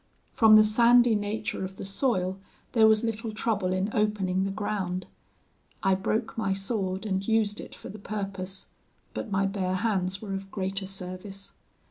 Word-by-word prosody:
From 220 -2 +7
the 215 - +9
sandy 235 +2 +5
nature 210 0 -2
of 190 0 -5
the - - -7
soil 195 -3 0 0.3
there 225 -3 +6
was 220 +1 +4
little 225 0 -2
trouble 210 -3 0
in 190 +3 0
opening 195 -3 +1
the - - -1
ground. 195 -3 -2 0.8
I 195 -1 +4
broke 215 +4 -1
my 195 -4 0
sword 195 -1 -2
and 195 -1 -1
used 220 -2 +1
it - - -10
for - - -10
the 215 - -9
purpose; 195 -2 -4 0.5
but 230 - -4
my 195 0 +1
bare 190 -2 -1
hands 190 -2 0
were 200 -2 -5
of 195 0 -5
greater 195 0 -2
service. 195 +1 -6
195 Hz, 165 wpm, -28 LUFS, 190-215 Hz, 0.8 s, the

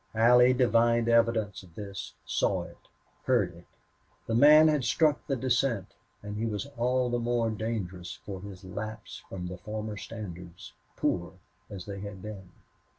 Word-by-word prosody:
Allie 125 +3 +6
divined 120 -2 +3
evidence 115 -3 +2
of 90 -4 -18
this, 100 -2 -7
saw - - +1
it, - - -14 0.4
heard 110 -9 +2
it. 85 0 -15 0.6
The 115 - -2
man 150 +6 +8
had 150 -3 +2
struck 150 +4 +2
the 135 - +1
descent, 120 -4 0 0.3
and 105 0 -5
he 115 +2 -1
was 105 +3 -3
all 125 +1 +1
the 120 - +1
more 120 -1 +1
dangerous 100 -5 -4
for 95 -2 -6
his 100 -1 -10
lapse 110 +3 -6
from 90 -2 -5
his 90 0 -7
former 110 0 -5
standards, 90 -6 -8 0.2
poor 85 0 -1 0.4
as 95 -4 -7
they 100 -1 -6
had 100 -1 -8
been. 100 -4 -8
110 Hz, 155 wpm, -29 LUFS, 95-120 Hz, 0.6 s, man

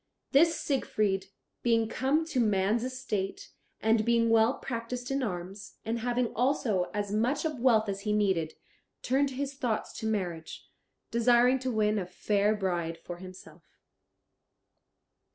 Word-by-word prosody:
This 325 +4 +4
Siegfried 205 -8 0 0.3
being 230 -2 +2
come 275 +7 +1
to 305 -5 -2
man's 210 0 +2
estate, 215 -7 -4 0.3
and 220 0 +3
being 230 0 +3
well 225 +3 +4
practised 245 +1 -5
in 270 0 0
arms, 190 -2 -5
and 230 +1 -1
having 245 0 -1
also 230 -7 +1
as 205 -1 -3
much 250 +9 0
of 305 -5 -2
wealth 230 -3 +4
as 195 -1 -2
he 210 +1 -2
needed, 190 -7 +1 0.5
turned 275 +2 +2
his 275 +1 -4
thoughts 245 -5 -2
to 220 - -3
marriage, 175 -7 -3 0.4
desiring 240 +2 +4
to 260 0 -2
win 215 -2 +1
a 180 - -4
fair 205 +3 +1
bride 175 -4 -2
for 175 +1 -8
himself. 185 +1 -12
225 Hz, 140 wpm, -29 LUFS, 200-250 Hz, 0.5 s, This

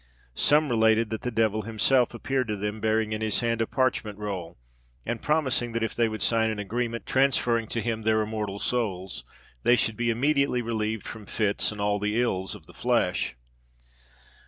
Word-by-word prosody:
Some 150 - +3
related 110 -1 +3
that 110 - -3
the 125 - -2
devil 110 -2 +1
himself 115 +3 +2
appeared 130 +1 -1
to 105 - -1
them, 105 +1 -4
bearing 110 0 +1
in 110 0 -2
his 110 +1 +1
hand 115 -1 0
a 115 - +1
parchment 120 -5 0
roll, 95 -5 -5 0.5
and 120 -1 -3
promising 130 -6 0
that 115 0 -1
if 115 - -1
they 115 -1 +2
would 110 -2 -3
sign 115 -1 +2
an 110 - -3
agreement, 115 +3 -3
transferring 125 -4 +2
to 115 0 -2
him 115 -2 -2
their 110 0 +2
immortal 105 -2 -3
souls, 95 - -2 0.4
they 120 - +5
should 110 -3 0
be 120 0 0
immediately 140 +1 +2
relieved 110 -2 -2
from 105 -3 -8
fits 105 -1 0
and 105 - -8
all 105 0 +1
the 105 +3 0
ills 95 -6 -1
of - - -13
the - - -16
flesh. - - 0
110 Hz, 185 wpm, -27 LUFS, 105-120 Hz, 0.5 s, they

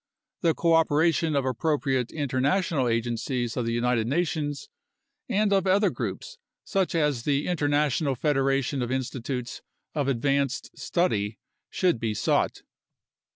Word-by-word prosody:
The 165 -3 +2
coopera 165 -1 +3
tion 160 -2 0
of 140 -2 +1
appropriate 135 -1 0
international 140 +1 0
agencies 120 +1 -1
of 120 -2 -1
the 115 - 0
United 120 -1 +1
Nations 145 -1 -1 0.6
and 205 0 +2
of 195 -1 +2
other 200 +2 +3
groups - - -5 0.2
such 195 -4 0
as 150 -6 +1
the 140 +3 0
International 145 -4 +1
Federation 135 -1 +1
of 120 0 -2
Institutes 130 -1 -3 0.3
of 145 -3 0
Ad 120 -4 -1
vanced 140 -1 0
Study 110 - -1 0.3
should 180 -10 +1
be 110 -2 -2
sought. - - 0
140 Hz, 130 wpm, -26 LUFS, 125-160 Hz, 0.6 s, coopera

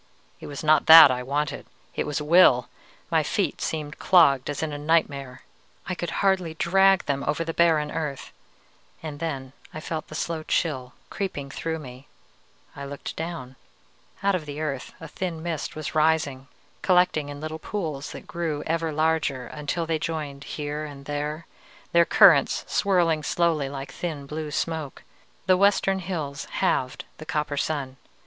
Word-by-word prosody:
_ - - -35 0.4
It - - -9
was 145 +1 -7
not 155 0 +4
that 160 -3 +11
I 125 0 -2
wanted, 145 +4 -2 0.3
it - - -2
was 150 - -1
will! 150 -5 +5 0.4
My - - +4
feet - - -1
seemed 150 -2 -4
clogged 145 -8 +4
as 145 +2 -3
in 155 -2 -3
a - - -4
nightmare. 140 -4 0 0.4
I 185 - -1
could 175 -1 -4 0.2
hardly 185 -4 +1
drag 195 +3 +4
them 140 -1 -1
over 150 +3 0
the 165 0 -4
barren 160 -3 +3
earth. 150 -5 -4 0.7
And 150 -2 -6
then 135 -5 -4 0.2
I - - -4
felt 155 0 -5
the 155 - -9
slow 165 0 -2
chill 130 -6 -1 0.2
creeping 145 -9 -4
through 160 +3 -3
me. 130 -2 -11 0.7
I 140 - -7
looked 140 0 -7
down. 160 -6 -6 0.7
Out 200 0 +3
of 165 -5 -2
the 145 +1 -6
earth 140 -4 -4
a 165 - -8
thin 165 0 -5
mist 165 -4 -4
was 155 -1 -5
rising, 155 -4 +1 0.3
collecting 180 -5 +2
in 145 0 -7
little 155 +1 -5
pools 155 -8 -4
that - - -9
grew 160 -4 -3
ever 165 0 -1
larger 155 -4 0
until 150 +3 -3
they 160 -1 -1
joined 150 -4 -4
here 150 0 -4
and 140 -2 -9
there, 150 +3 -4 0.5
their 170 0 +5
currents 170 -10 +5
swirling 175 -5 +2
slowly 155 -3 0
like 135 0 -7
thin 155 -5 -5
blue 150 +2 -5
smoke. 155 -1 -3 0.4
The 185 -1 +4
western 195 0 +3
hills 160 -6 -4
halved 130 -1 -1
the 155 - -8
copper 150 -4 -1
sun. 140 -3 -2
155 Hz, 165 wpm, -25 LUFS, 145-165 Hz, 0.7 s, that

